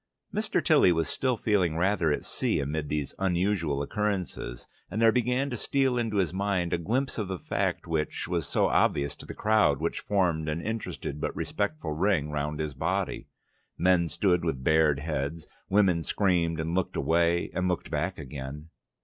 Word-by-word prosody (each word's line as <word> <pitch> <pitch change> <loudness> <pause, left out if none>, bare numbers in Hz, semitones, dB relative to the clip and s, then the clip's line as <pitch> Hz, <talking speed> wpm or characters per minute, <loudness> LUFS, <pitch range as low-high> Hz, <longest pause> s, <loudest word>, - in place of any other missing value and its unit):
Mr. - - 0
Tilly 90 - +6
was 80 -1 +1
still 130 -3 0
feeling 95 -7 +1
rather 90 -3 +2
at 75 - -2
sea - - 0
amid 75 +1 -2
these 75 -2 -2
unusual 90 -6 +1
occurrences, 95 -9 -3 0.2
and 105 - -3
there 115 0 +6
began 125 +4 +1
to - - -2
steal 135 +1 +1
into 115 -4 -1
his 90 -3 +1
mind 95 -3 0
a 85 - +1
glimpse 125 +9 -1
of 105 - -2
the 95 -1 -3
fact - - -2
which 80 -2 -2
was 85 -4 -1
so - - +2
obvious 70 0 +2
to - - -12
the - - -7
crowd 105 -10 +3
which 85 +2 -1
formed 85 -6 0
an 75 +2 -1
interested 105 -8 -4
but - - -2
respectful 105 - -2
ring 80 -2 +1
round 75 +1 -2
his 75 -2 -2
body. 65 - -2 0.5
Men 85 -1 +3
stood 90 -3 +2
with 70 -7 -2
bared 80 -1 +4
heads; 75 +1 -3 0.2
women 95 -4 +3
screamed 85 -3 +1
and 80 +1 -2
looked 95 0 -1
away 85 +1 +2
and 90 0 0
looked 90 -2 -2
back 85 +5 -1
again. 70 +1 -7
85 Hz, 175 wpm, -28 LUFS, 75-100 Hz, 0.5 s, Tilly